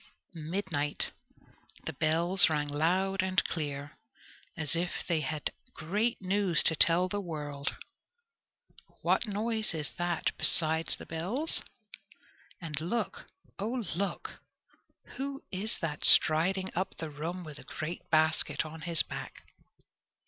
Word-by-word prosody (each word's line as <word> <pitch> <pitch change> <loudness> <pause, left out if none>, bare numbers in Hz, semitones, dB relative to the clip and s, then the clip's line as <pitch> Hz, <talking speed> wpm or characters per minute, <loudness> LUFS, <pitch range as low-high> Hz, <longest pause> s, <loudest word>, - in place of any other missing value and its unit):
Midnight! 160 -3 -1 0.7
The - - -2
bells 170 +4 +4
rang 150 -2 -1
loud 185 +6 +1
and 185 0 +2
clear, 145 -2 -4 0.6
as 150 -2 +1
if 175 +1 -2
they 165 -3 +1
had 150 +1 -2 0.2
great 210 +10 -1
news 190 -4 +1
to 160 - +3
tell 170 +4 +4
the 205 +2 -3
world. 145 -5 -4 1.3
What - - +2
noise 215 -1 -1
is 150 -3 -2
that 175 -1 -1
besides 160 0 +4
the - - -11
bells? 200 - -1 1.0
And 155 -4 -4
look, 185 +9 -3 0.3
oh, 230 +3 -2
look! 195 +4 -4 0.8
who 275 +1 -4
is 205 +4 -2
that 155 -3 -3
striding 185 +5 +7
up 185 +2 -3
the 160 -2 -5
room 165 +5 -5
with 150 -3 -8
a - - -12
great 160 +3 -6
basket 160 +1 +2
on 160 +1 -9
his 165 0 +3
back? - - -8
170 Hz, 125 wpm, -30 LUFS, 155-190 Hz, 1.3 s, striding